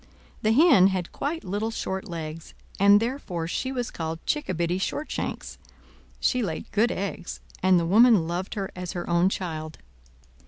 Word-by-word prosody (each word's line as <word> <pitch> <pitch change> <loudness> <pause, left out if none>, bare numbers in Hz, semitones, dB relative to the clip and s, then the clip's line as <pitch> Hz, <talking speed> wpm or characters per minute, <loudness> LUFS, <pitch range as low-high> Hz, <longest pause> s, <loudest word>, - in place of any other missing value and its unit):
The 215 - +2
Hen 235 - +6
had 185 -2 -2
quite 320 +3 -3
little 205 +4 -2
short 190 -3 -4
legs, 160 -1 -7 0.2
and 200 +1 +7
therefore 220 -9 -3
she 260 +9 -2
was 245 -3 -3
called 160 0 -5
Chickabiddy 180 - -1
Shortshanks; 300 +9 -4 0.6
she 250 - +1
laid 170 -8 -4
good 225 +4 +2
eggs, 195 -2 -4 0.2
and 185 -1 +5
the 170 - -1
woman 210 -1 +5
loved 175 +3 -3
her 195 -2 -3
as 180 -1 -5
her 175 - -5
own 170 +2 +3
child. 160 -5 -5
190 Hz, 155 wpm, -26 LUFS, 170-225 Hz, 0.6 s, and